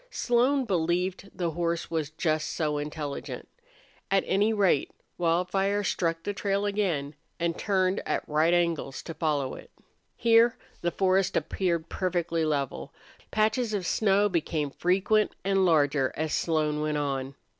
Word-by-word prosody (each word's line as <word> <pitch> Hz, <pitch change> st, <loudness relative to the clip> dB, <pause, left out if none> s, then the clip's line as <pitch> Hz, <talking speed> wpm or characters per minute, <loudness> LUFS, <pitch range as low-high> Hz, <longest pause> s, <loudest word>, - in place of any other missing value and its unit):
Slone 260 Hz, -, +2 dB
believed 180 Hz, 0 st, -1 dB
the 170 Hz, -2 st, -2 dB
horse 170 Hz, +1 st, -2 dB
was 160 Hz, -3 st, -1 dB
just 155 Hz, -1 st, -1 dB
so 150 Hz, -3 st, -1 dB
intelligent. 150 Hz, -1 st, -5 dB, 0.6 s
At 195 Hz, 0 st, +3 dB
any 205 Hz, +3 st, +2 dB
rate, 195 Hz, -9 st, +2 dB, 0.3 s
Wildfire 180 Hz, +4 st, +1 dB
struck 165 Hz, -4 st, -1 dB
the 205 Hz, -, -2 dB
trail 200 Hz, 0 st, -1 dB
again, 180 Hz, -9 st, -1 dB, 0.3 s
and 170 Hz, -1 st, 0 dB
turned 190 Hz, -1 st, +1 dB
at -, -, -1 dB
right 155 Hz, +2 st, +2 dB
angles 170 Hz, -6 st, 0 dB
to 165 Hz, -, -6 dB
follow 150 Hz, -5 st, -1 dB
it. -, -, -11 dB, 0.5 s
Here 230 Hz, 0 st, +4 dB, 0.2 s
the 175 Hz, -, +1 dB
forest 190 Hz, +1 st, +2 dB
floor -, -, +3 dB
appeared 170 Hz, -4 st, -1 dB
perfectly 175 Hz, -3 st, -1 dB
level. 140 Hz, -4 st, -2 dB, 0.4 s
Patches 220 Hz, +1 st, +1 dB
of 190 Hz, -3 st, -2 dB
snow 205 Hz, +2 st, +3 dB
became 160 Hz, -5 st, -1 dB
frequent, 195 Hz, +7 st, +1 dB
and 195 Hz, -1 st, +3 dB
larger 145 Hz, -5 st, +3 dB
as 155 Hz, 0 st, -1 dB
Slone 155 Hz, -2 st, 0 dB
went 150 Hz, 0 st, -1 dB
on. 135 Hz, -2 st, -2 dB
175 Hz, 145 wpm, -27 LUFS, 155-195 Hz, 0.6 s, Here